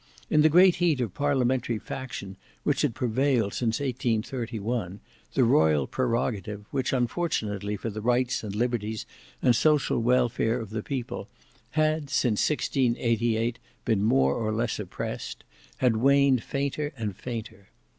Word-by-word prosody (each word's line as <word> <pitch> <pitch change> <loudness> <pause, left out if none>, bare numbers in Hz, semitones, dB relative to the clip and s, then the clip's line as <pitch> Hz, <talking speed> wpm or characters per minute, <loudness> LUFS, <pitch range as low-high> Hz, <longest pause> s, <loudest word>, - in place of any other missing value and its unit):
In 150 - +5
the 155 - +6
great 180 +3 +6
heat 165 -6 +2
of 115 -7 -2
parliamentary 130 -4 +1
faction 105 -6 -6 0.3
which 145 - +1
had 140 -7 0
prevailed 125 -3 +1
since 115 -2 0
1831, 115 -5 -2 0.4
the 130 - +4
royal 80 - +4
prerogative, 110 - -2
which, 130 -2 -1
unfortunately 110 - -1
for 115 +3 -4
the 110 +1 -6
rights 125 +2 +1
and 105 -2 -5
liberties 110 -2 -1 0.4
and 120 - +5
social 150 -1 +3
welfare 120 -1 +2
of 110 -3 -7
the 110 0 -3
people, 130 0 -4 0.5
had 155 -1 +1
since 125 -6 +2
1688 120 -4 0 0.3
been 110 -4 +2
more 70 -10 +3
or 110 +4 -1
less 115 +1 -1
oppressed, 100 -4 -5 0.3
had 125 -4 +2
waned 140 0 +4
fainter 140 +2 -2
and 105 -4 -3
fainter. 110 -3 -7
120 Hz, 135 wpm, -27 LUFS, 110-135 Hz, 0.5 s, the